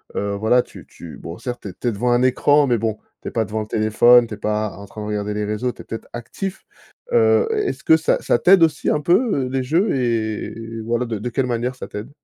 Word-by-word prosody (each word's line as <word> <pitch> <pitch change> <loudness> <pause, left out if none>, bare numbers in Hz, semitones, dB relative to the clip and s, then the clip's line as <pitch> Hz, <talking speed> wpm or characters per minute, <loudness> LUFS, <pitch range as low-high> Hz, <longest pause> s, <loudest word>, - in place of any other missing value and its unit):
heu, 100 0 -2
voilà 110 +5 +3
tu - - -13
tu 85 - -11
bon, 85 +1 -8
certes, 120 -1 -6
tu - - -6
es - - -9
tu 120 - -5
es - - -1
devant 120 +4 -1
un 120 - +2
écran 145 +3 +4
mais 120 -3 +2
bon 110 -1 -2 0.2
tu - - -9
es - - -4
pas 115 - 0
devant 110 +1 -4
le 110 - -4
téléphone, 115 +3 +5
tu 110 - -6
es - - -17
pas 105 0 -1
en 100 - -9
train 105 +2 -10
de 105 - -5
regarder 105 0 -2
les 105 0 -2
réseaux, 105 +4 -2
tu - - -12
es - - -12
peut-être, 115 - -7
actif. 185 - -6 0.5
Heu, 470 -1 +4
est-ce 420 -3 -2
que 160 - +5
ça 160 - +1
ça 120 - +1
t'aide 185 -1 +6
aussi 160 +1 +1
un 150 - +1
peu, 180 - +2
heu, - - -6
les 130 0 -1
jeux 170 - +1
et 115 -2 -3
voilà, 120 +1 0
de 115 -2 -3
de 125 - -4
quelle 130 +2 -1
manière 125 +1 -2
ça - - -8
t'aide? 105 +4 -7
120 Hz, 265 wpm, -21 LUFS, 105-135 Hz, 0.5 s, t'aide